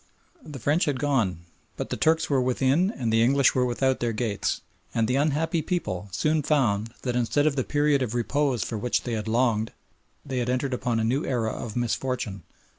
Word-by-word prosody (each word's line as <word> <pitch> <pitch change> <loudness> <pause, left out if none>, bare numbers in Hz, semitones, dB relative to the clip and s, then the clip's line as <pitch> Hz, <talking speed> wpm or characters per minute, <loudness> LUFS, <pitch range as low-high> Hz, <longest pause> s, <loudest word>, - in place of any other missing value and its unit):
The 145 -3 -8
French 145 - +1
had 145 -3 0
gone 115 - 0 0.4
but - - -4
the - - 0
Turks 160 +1 +2
were 135 -3 +2
within 135 +8 +2
and 120 - -2
the 115 - +4
English 135 +3 +4
were 125 -1 +2
without 130 +2 +1
their 120 -1 -1
gates, 110 -2 -1 0.3
and 115 -1 +2
the 125 - +1
unhappy 155 +3 +1
people 130 - -3
soon 155 - +1
found 115 -7 +1
that 125 -2 -1
instead 125 +4 +1
of 155 -2 +2
the 130 - 0
period 145 0 +2
of 120 -2 -2
repose 130 0 +1
for 110 - -4
which 125 +3 0
they 115 -3 -2
longed 110 0 +1 0.5
they 130 -3 -2
had 120 0 -1
entered 130 +1 0
upon 120 -2 -1
a - - 0
new 125 +6 +1
era 115 -4 -1
of 110 -3 -6
misfortune. 120 -4 -2
125 Hz, 195 wpm, -26 LUFS, 115-145 Hz, 0.5 s, the